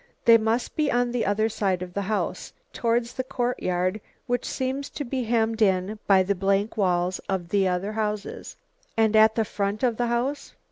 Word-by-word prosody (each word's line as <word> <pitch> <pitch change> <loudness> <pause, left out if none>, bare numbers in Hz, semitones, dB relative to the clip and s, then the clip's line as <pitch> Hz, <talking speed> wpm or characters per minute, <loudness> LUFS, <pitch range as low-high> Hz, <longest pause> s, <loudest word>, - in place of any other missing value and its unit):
They 230 -1 +8
must 225 +2 -1
be 300 -2 +1
on 245 0 +1
the 240 -4 -1
other 210 +2 +2
side 195 -5 -1
of 180 -1 -9
the 200 - -1
house, 215 - -2 0.2
towards 235 0 0
the 260 - -3
courtyard 210 -7 -1 0.2
which 245 0 -1
seems 265 +2 -3
to 290 - -5
be 255 0 -2
hemmed 225 -1 0
in 195 +1 +1
by 190 -2 +5
the 200 +2 +1
blank 195 +2 0
walls 180 -3 +1
of 185 -3 -2
the 195 -1 +2
other 185 +3 -1
houses." 210 -1 -4 0.4
"And 220 -1 +3
at 220 0 +6
the 225 - +1
front 200 +3 -2
of 240 -3 +2
the 240 - 0
house?" 245 +5 -2
220 Hz, 190 wpm, -25 LUFS, 195-240 Hz, 0.4 s, They